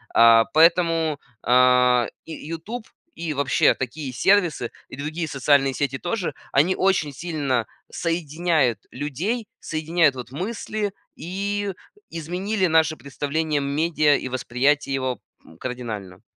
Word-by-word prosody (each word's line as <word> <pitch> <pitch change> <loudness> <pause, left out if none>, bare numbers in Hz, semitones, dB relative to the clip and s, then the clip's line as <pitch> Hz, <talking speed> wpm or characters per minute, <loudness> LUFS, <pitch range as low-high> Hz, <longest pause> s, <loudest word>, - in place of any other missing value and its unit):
А, 115 -1 +7
поэтому, 165 +1 +3 0.2
а, 125 0 +4 0.2
и 165 - -10 0.2
"Ютуб", 215 +9 -6 0.3
и 165 -2 -4
вообще 140 -1 +3
такие 130 +2 -5
сервисы 170 - +2 0.2
и - - -8
другие 155 +3 -3
социальные 135 -1 +2
сети 135 -2 -1
тоже, 180 0 -2 0.2
они 165 +7 +3
очень 180 -7 +1
сильно 140 -7 -1 0.2
соединяют 160 - 0
людей, 170 - -3
соединяют 160 -2 +1
вот 125 0 -8
мысли, 205 +4 -3 0.2
и 200 +3 -3 0.4
изменили 185 +5 -2
наше 160 -2 +3
представление 145 +2 -2
медиа 150 +1 +2
и - - -5
восприятие 135 +3 0
его, 130 -3 -2 0.3
м, 80 - -16
кардинально. 110 -8 -6
150 Hz, 115 wpm, -23 LUFS, 130-170 Hz, 0.4 s, А